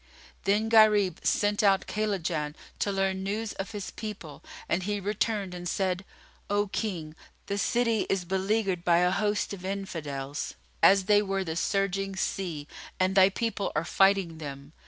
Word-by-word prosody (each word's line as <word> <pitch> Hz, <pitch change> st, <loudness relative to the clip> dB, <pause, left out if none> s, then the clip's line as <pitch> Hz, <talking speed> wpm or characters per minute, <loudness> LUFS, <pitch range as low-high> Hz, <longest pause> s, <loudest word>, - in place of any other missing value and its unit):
Then 205 Hz, +3 st, +2 dB
Gharib 210 Hz, -5 st, +5 dB
sent 205 Hz, +1 st, +2 dB
out 195 Hz, -2 st, +3 dB
Kaylajan, 180 Hz, -8 st, -2 dB, 0.2 s
to 200 Hz, -, +1 dB
learn 195 Hz, -1 st, 0 dB
news 210 Hz, +3 st, -2 dB
of 195 Hz, -, -5 dB
his 205 Hz, -3 st, -6 dB
people, 190 Hz, -9 st, -8 dB, 0.2 s
and 175 Hz, -, +1 dB
he 205 Hz, +2 st, -2 dB
returned 205 Hz, -1 st, -1 dB
and 175 Hz, -1 st, -5 dB
said, 190 Hz, -1 st, -1 dB, 0.4 s
"O 205 Hz, 0 st, +2 dB
King, 170 Hz, -8 st, -3 dB, 0.3 s
the 200 Hz, 0 st, -2 dB
city 230 Hz, -2 st, +1 dB
is 190 Hz, -2 st, 0 dB
beleaguered 190 Hz, 0 st, 0 dB
by 170 Hz, -1 st, +4 dB
a 180 Hz, +1 st, +3 dB
host 205 Hz, +1 st, 0 dB
of 185 Hz, -2 st, -8 dB
Infidels, 155 Hz, -8 st, -4 dB, 0.3 s
as 195 Hz, -1 st, +6 dB
they 205 Hz, 0 st, +5 dB
were 195 Hz, -1 st, -1 dB
the 160 Hz, -3 st, -4 dB
surging 195 Hz, +1 st, 0 dB
sea, 170 Hz, -6 st, -3 dB, 0.3 s
and 185 Hz, +1 st, +2 dB
thy 190 Hz, 0 st, +7 dB
people 220 Hz, 0 st, -2 dB
are 155 Hz, +2 st, 0 dB
fighting 195 Hz, -5 st, +3 dB
them. 140 Hz, 0 st, -8 dB
195 Hz, 155 wpm, -28 LUFS, 180-205 Hz, 0.4 s, thy